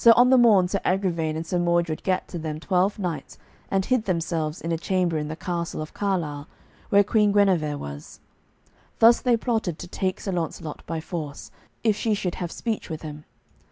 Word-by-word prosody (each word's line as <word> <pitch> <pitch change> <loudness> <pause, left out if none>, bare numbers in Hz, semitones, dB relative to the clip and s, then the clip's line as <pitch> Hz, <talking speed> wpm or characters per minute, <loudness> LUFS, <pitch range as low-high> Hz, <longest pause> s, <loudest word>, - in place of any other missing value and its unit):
So 230 - +9
on 250 +1 +6
the 260 - +7
morn 210 -7 +6
Sir 195 +2 -1
Agravaine 170 -5 0
and 160 +1 -3
Sir 180 +1 -1
Mordred 170 -2 +1
gat 185 -1 0
to 175 - -5
them 155 -1 -4
twelve 185 +3 +1
knights 170 -8 -4 0.3
and 195 -1 +1
hid 255 -4 +1
themselves 165 -2 -1
in 165 - -4
a 165 - +1
chamber 180 -2 0
in 150 - -3
the 155 - -4
castle 170 -1 -3
of 155 0 -6
Carlisle, 160 -8 -2 0.4
where 200 0 +6
Queen 210 0 +3
Guenever 180 -8 +2
was; 70 - -8 0.8
thus 230 +1 +6
they 245 -2 +3
plotted 220 -8 -1
to 175 - -8
take 185 +1 -2
Sir 195 - -3
Launcelot 160 -3 -4
by 165 0 -3
force, 155 -4 -6 0.3
if 220 -3 +3
she 215 0 0
should 180 -3 -2
have 175 -1 -3
speech 225 -5 -3
with 160 -1 -5
him. 150 -1 -8
175 Hz, 195 wpm, -25 LUFS, 160-200 Hz, 0.8 s, So